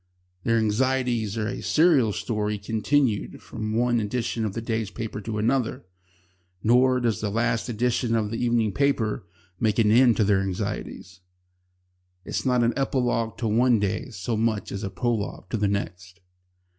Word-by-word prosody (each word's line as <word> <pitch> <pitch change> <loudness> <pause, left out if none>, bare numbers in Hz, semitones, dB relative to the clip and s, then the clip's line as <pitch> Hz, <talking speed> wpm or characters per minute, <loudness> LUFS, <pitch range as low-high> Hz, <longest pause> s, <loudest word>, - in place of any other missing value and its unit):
Their 115 0 +2
anxieties 115 -1 0
are 105 -1 -1
a - - -4
serial 155 -9 +4
story 105 0 -2
continued 110 +3 0
from 110 0 -5
one 120 0 +2
edition 115 +1 -2
of 105 - -3
the 115 - -3
day's 110 -2 -2
papers 105 -2 -6
to 110 -2 -3
another 115 -1 0 0.8
Nor 125 +2 +4
does 115 -3 0
the 105 - -1
last 115 +3 0
edition 120 0 0
of 105 -2 0
the 115 - -2
evening 120 -3 +2
paper 110 -5 0 0.3
make 110 -2 +1
an 110 -2 +4
end 120 0 +5
of 110 - +4
their 100 -1 +3
anxieties. 95 0 -5 1.1
It - - -8
is - - -1
not 125 -1 +3
an 115 0 +2
epilogue 125 -4 0
to 115 - -2
one 120 +2 +3
day 100 +5 -2
so 110 +1 -3
much 110 -1 -1
as 100 - -4
a 100 - -2
prologue 110 -4 -3
to - - 0
the 105 -1 +1
next. 90 -1 -4
115 Hz, 170 wpm, -25 LUFS, 105-120 Hz, 1.1 s, end